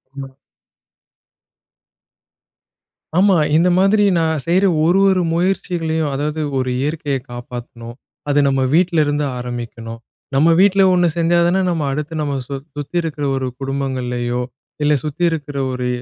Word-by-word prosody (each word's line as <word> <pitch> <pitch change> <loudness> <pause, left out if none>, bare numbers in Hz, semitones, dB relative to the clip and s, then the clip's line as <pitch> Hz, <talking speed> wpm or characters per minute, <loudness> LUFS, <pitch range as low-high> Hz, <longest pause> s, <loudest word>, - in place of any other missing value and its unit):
ம். 135 -1 -7 2.9
ஆமா. 195 0 +5 0.2
இந்த 175 +2 +3
மாதிரி 195 +3 +4
நான் 160 -2 0
செய்ற 185 +4 +3 0.2
ஒரு, 180 +3 +3
ஒரு 185 -1 +2
முயற்சிகளையும் 165 -3 -1
அதாவது 150 +3 -2 0.2
ஒரு 130 -1 -1
இயற்கைய 145 -2 -1
காப்பாத்தணும். 120 -1 -8 0.3
அத 145 0 +3
நம்ம 135 -1 +1
வீட்டிலருந்து 155 -4 +2
ஆரம்பிக்கணும். 120 -2 -6 0.4
நம்ம 155 +5 +4
வீட்ல 195 0 +4
ஒண்ணு 175 -1 +3
செஞ்சா 170 +1 +2
தானே, 185 +2 +2
நம்ம 165 -3 -1
அடுத்து 150 +3 -4
நம்ம 145 -1 -2
சு 140 - -4 0.2
சுத்தி 145 +3 -7
இருக்கிற 155 -3 -5
ஒரு 130 -1 -2
குடும்பங்கள்லயோ, 130 -3 -2 0.4
இல்ல 150 0 +3
சுத்தி 155 +3 -4
இருக்கிற 145 -3 -5
ஒரு 125 -1 -3
150 Hz, 125 wpm, -18 LUFS, 135-170 Hz, 2.9 s, ஆமா